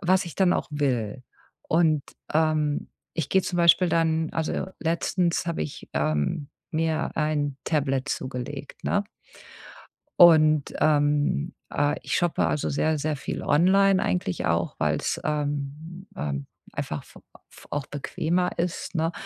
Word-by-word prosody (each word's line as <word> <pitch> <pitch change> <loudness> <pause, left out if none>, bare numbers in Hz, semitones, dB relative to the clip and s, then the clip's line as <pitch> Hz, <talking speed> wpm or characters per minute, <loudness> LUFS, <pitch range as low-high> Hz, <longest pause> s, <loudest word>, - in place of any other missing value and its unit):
was 185 0 +3
ich 170 - -8
dann 185 -2 +3
auch - - -1
will. 130 -5 -1 0.4
Und, 160 -3 +2 0.3
ähm, 155 -2 +1 0.3
ich 160 -4 -2
gehe 190 - +3
zum 180 - -3
Beispiel 170 +1 +5
dann 160 -1 +1
also 160 +3 -1
letztens 170 +1 0
habe 170 - -1
ich, 75 - -7
ähm, 110 - 0 0.2
mir 160 0 0
ein 150 -3 0
Tablet 140 -3 0
zugelegt, 135 +2 -5
ne? 205 - +1 1.2
Und, 155 -4 +6
ähm, 145 - +2 0.2
äh, 145 0 +1
ich - - -2
shoppe 175 -2 +1
also 150 - 0
sehr, 155 +2 +1
sehr 150 +1 -1
viel - - -5
online 190 +5 +4
eigentlich 185 0 -1
auch, 85 +1 0
weil's, - - 0
ähm 150 +4 -3
ähm, 70 -2 -3 0.3
einfach - - -4
f - - -16 0.3
f - - -16
auch 145 -2 -2
bequemer 170 +5 -1
ist, 180 +1 -2
ne? 165 -1 +1
155 Hz, 135 wpm, -26 LUFS, 145-170 Hz, 1.2 s, Und